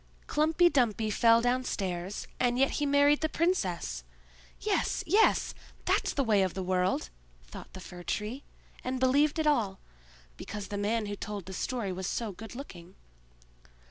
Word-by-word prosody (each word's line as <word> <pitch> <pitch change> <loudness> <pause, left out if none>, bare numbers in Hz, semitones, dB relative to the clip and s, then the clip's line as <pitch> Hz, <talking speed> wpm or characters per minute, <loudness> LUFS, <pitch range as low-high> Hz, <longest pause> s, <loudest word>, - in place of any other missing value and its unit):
"Klumpy 315 +3 +3
Dumpy 225 -8 +1
fell 230 +2 +5
downstairs, 200 -7 -1
and 245 -1 +2
yet 270 +1 +3
he 290 - 0
married 285 +1 +4
the 315 - +1
princess! 185 - -1 0.6
Yes, - - 0
yes! 415 +7 +3 0.3
that's - - +2
the 275 - +2
way 215 -5 +3
of 185 -2 0
the 190 - -2
world!" 180 - 0 0.3
thought - - -11
the 190 - -8
Fir 180 -1 -10
tree, 215 +9 -3 0.4
and 255 0 -2
believed 285 +4 +3
it 315 - 0
all, 220 -10 +1 0.6
because 205 -2 -6
the 205 - -4
man 215 +2 0
who 205 0 -4
told 205 -1 -6
the 190 - -7
story 230 -1 -2
was 185 0 -4
so 230 -3 -2
good 225 +5 -10
looking. 185 -9 -10
225 Hz, 160 wpm, -30 LUFS, 190-275 Hz, 0.6 s, fell